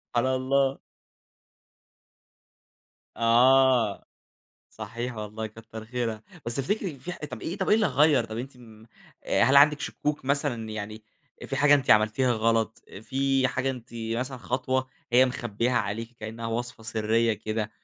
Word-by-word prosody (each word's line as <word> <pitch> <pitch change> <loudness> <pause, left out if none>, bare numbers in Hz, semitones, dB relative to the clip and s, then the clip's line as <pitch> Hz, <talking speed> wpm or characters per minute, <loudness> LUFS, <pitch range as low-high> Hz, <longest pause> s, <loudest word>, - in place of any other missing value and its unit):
على 130 +2 +2
الله. 135 +1 +1 2.4
آه، 120 -1 +4 0.7
صحيح 115 +3 -6
والله، 110 +1 -5
كتّر 110 0 -10
خيرها، 115 -2 -3 0.2
بس 115 - -2
تفتكري 170 +1 -2
في 180 - -6
ح - - -9
طب 125 - -7
إيه 175 - -4
طب 190 - -1
إيه - - +6
اللي 215 -1 +3
غيّر، 150 -1 +3
طب 110 +1 -6
أنتِ 130 +1 -7
م 110 -3 -15 0.6
هل 135 +1 +5
عندِك 145 0 +6
شكوك 150 -2 -3
مثلًا 135 -5 -1
يعني 110 0 -6 0.4
في - - -3
حاجة 145 0 +6
أنتِ 140 -3 +1
عملتيها 110 +4 +4
غلط، 115 0 0 0.2
في 135 +1 +1
حاجة 130 +1 -1
أنتِ 125 -2 -8
مثلًا 115 +4 -3
خطوة 130 +1 -1 0.3
هي 130 +1 +6
مخبيّاها 120 -1 -2
عليكِ 115 +2 -2
كأنها 115 +1 -6
وصفة 120 0 -4
سرية 115 +1 +1
كده، 110 +1 -3
120 Hz, 140 wpm, -26 LUFS, 110-135 Hz, 2.4 s, إيه